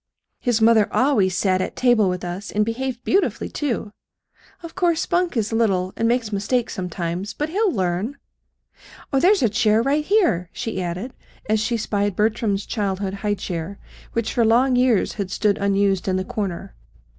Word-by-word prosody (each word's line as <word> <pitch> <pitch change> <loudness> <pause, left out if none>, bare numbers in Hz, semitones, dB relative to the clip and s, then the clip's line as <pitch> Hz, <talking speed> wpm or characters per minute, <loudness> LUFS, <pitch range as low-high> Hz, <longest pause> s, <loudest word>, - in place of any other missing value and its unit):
"His 240 -2 0
mother 220 -2 +4
always 205 -10 +2
sat 185 -1 +2
at - - -4
table 240 -6 +3
with 180 0 -3
us, 180 +4 -5
and 210 0 +1
behaved 245 +2 -3
beautifully, 390 +2 0
too. 240 -7 -3 0.7
Of 335 - -8
course 345 -3 +1
Spunk 350 -5 0
is 225 0 -1
little, 190 -5 +1
and 230 - 0
makes 235 -2 0
mistakes 230 +5 0
sometimes. 180 0 -4
But 300 +1 -2
he'll 405 +3 +1
learn. 190 +6 -2 1.0
Oh, 270 - +4
there's 380 +4 +4
a - - +5
chair 220 0 +2
right 285 +3 +1
here," 330 - +2
she 225 -4 -4
added, 180 +9 -4 0.3
as 215 0 +2
she 235 +2 0
spied 205 -2 -1
Bertram's 210 -1 0
childhood's 195 -2 -2
high 205 +1 -1
chair, 185 0 -5 0.4
which 230 -1 -1
for 235 - +2
long 245 +4 +3
years 250 -4 +2
had 200 -3 -4
stood 205 +1 0
unused 200 -1 +1
in 185 - +1
the 185 0 -1
corner. 195 -2 -4
215 Hz, 170 wpm, -22 LUFS, 195-250 Hz, 1.0 s, a